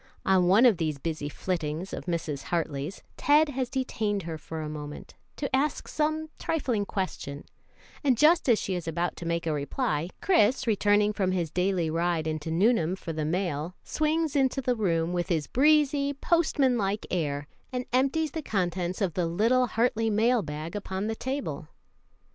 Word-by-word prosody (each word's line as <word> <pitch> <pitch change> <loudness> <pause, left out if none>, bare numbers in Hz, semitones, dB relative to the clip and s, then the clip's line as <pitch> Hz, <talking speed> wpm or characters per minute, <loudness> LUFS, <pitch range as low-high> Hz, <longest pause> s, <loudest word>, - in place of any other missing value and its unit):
On 185 -2 +4
one 205 +7 +6
of 230 -7 +5
these 155 -3 -1
busy 150 0 -3
flittings 165 +1 -3
of - - -5
Mrs. 165 -5 -3
Hartley's, 160 0 -3
Ted 300 +1 +4
has 260 -3 -2
detained 215 -6 -1
her 165 -1 -4
for 160 +1 -6
a - - -4
moment, 150 -1 -7 0.2
to 280 -2 -1
ask 280 +2 0
some 310 +1 -1
trifling 250 -10 -1
question, 150 -7 -4 0.6
and 260 -4 +3
just 310 +1 +5
as 230 - +6
she 195 - -2
is 175 -2 -4
about 170 +2 -1
to 170 - -6
make 170 0 -1
a 160 - 0
reply, 150 - -1
Chris, 260 - +3
returning 210 -1 +3
from 190 -2 0
his 170 -4 -1
daily 180 -1 +1
ride 165 0 0
into 155 0 -3
Nuneham 180 0 +2
for 170 -3 -6
the 155 -1 -2
mail, 170 0 -2
swings 310 0 0
into 270 -1 +2
the 250 -2 0
room 170 -5 0
with 175 +1 -1
his 160 -4 +1
breezy, 285 0 +3
postman 280 -5 +2
like 200 +1 -1
air, 145 -5 -1 0.3
and 250 -1 -3
empties 275 +4 +2
the 320 - -4
contents 180 - -2
of 185 -5 +1
the 175 0 0
little 230 +9 +2
Hartley 225 -1 +1
mail 225 +3 +3
bag 155 +1 -6
upon 195 -1 -3
the 220 +1 -2
table. 235 - -4
190 Hz, 175 wpm, -28 LUFS, 165-255 Hz, 0.6 s, one